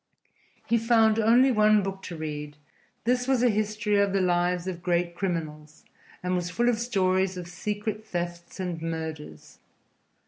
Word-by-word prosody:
He 235 - +2
found 225 -1 +4
only 240 +4 +5
one 215 -2 +4
book 195 0 -4
to 175 - -6
read: 150 -1 -6 0.5
this 245 +2 +1
was 260 -2 +2
a 245 - +5
history 210 0 0
of 200 -1 +2
the 195 - +2
lives 180 -1 +1
of 180 -2 -5
great 175 -1 0
criminals 155 -5 -5 0.4
and 180 0 -1
was 175 -1 -1
full 240 +6 +1
of 230 -2 0
stories 190 -5 +1
of 175 -1 -6
secret 210 +4 -4
thefts 175 -2 -5
and 175 -3 -3
murders. 160 - -6
185 Hz, 160 wpm, -27 LUFS, 170-215 Hz, 0.5 s, only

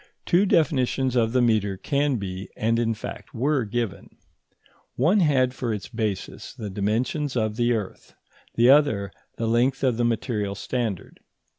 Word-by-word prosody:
Two 190 +4 +3
definitions 135 -6 +1
of 115 -2 +2
the 125 0 +2
metre 105 -4 +1
can 140 +6 0
be, 95 -3 -5
and 115 +1 +1
in 115 -1 0
fact - - -8
were 135 +2 +1
given. 115 -2 -4 0.8
One 165 - +3
had 130 -7 +3
for 125 -3 -3
its 105 -4 -5
basis 105 -4 -4
the 105 -3 -6
dimensions 120 +8 -1
of 110 -3 0
the 120 +1 +2
earth, 105 -5 -5 0.4
the 120 +1 +4
other 110 -10 +3 0.3
the 115 - -2
length 125 +4 +1
of 125 -4 +2
the 120 - +1
material 110 -3 -1
standard. 110 -3 -4
120 Hz, 155 wpm, -24 LUFS, 105-130 Hz, 0.8 s, the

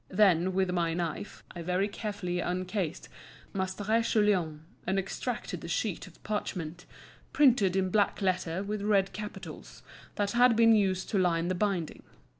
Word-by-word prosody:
Then, 185 -2 +4
with 190 -1 +1
my 170 -2 0
knife, 170 +3 -4
I 170 - -5
very 180 +3 0
carefully 200 -4 -4
uncased 180 -1 -2 0.5
Maistre 200 +4 0
Guillaume, 195 -9 +1 0.3
and 190 - +1
extracted 195 -2 -3
the - - -7
sheet 185 +2 -2
of 175 - -18
parchment, 180 -5 -4 0.5
printed 235 -10 +4
in 190 -1 +1
black 205 0 +2
letter 185 -2 0
with 205 0 -3
red 200 -2 +2
capitals, 210 0 -8 0.3
that 205 -1 0
had 245 0 +5
been 230 0 +6
used 190 -3 +2
to 200 - +2
line 170 -1 +1
the - - +1
binding. 185 -4 -1
190 Hz, 150 wpm, -30 LUFS, 180-210 Hz, 0.5 s, been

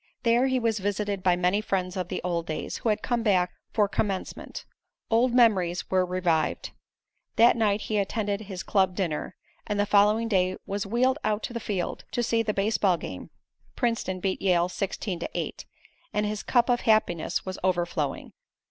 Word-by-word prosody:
There 240 +2 +3
he 260 -1 +1
was 225 -3 0
visited 205 0 -2
by 180 -1 +3
many 180 +3 +1
friends 185 -3 -2
of 185 -2 -2
the - - -4
old 170 -1 -2
days, 155 - -4
who 230 - -1
had 210 - 0
come 240 -1 0
back 185 -5 +2 0.2
for 210 -2 +2
Commencement. 195 -1 -3 0.5
Old 235 +3 +4
memories 195 -8 +3
were 185 -1 +3
revived. 180 -3 0 0.6
That 235 +2 +6
night 210 -2 +1
he 215 -1 -1
attended 205 0 -1
his 190 -3 -6
club 190 -3 +2
dinner, 170 -6 -2 0.3
and 210 -1 -1
the 205 - +3
following 210 +3 +4
day 185 -3 +1
was 200 +1 -3
wheeled 255 +6 +2
out 210 0 0
to - - -4
the 235 - -3
field 200 -5 -3
to 240 - 0
see 230 0 +2
the 220 -1 0
baseball 200 -3 +2
game, 95 - -7 0.5
Princeton 230 -6 -1
beat 190 0 -2
Yale 180 -2 +2
16 190 -1 -3
to - - -4
8, - - -4 0.5
and 210 0 +1
his 210 0 -2
cup 240 -2 +2
of 245 -1 +2
happiness 215 -7 +1
was 185 0 -5
overflowing. 175 -5 -1
200 Hz, 180 wpm, -27 LUFS, 185-220 Hz, 0.6 s, That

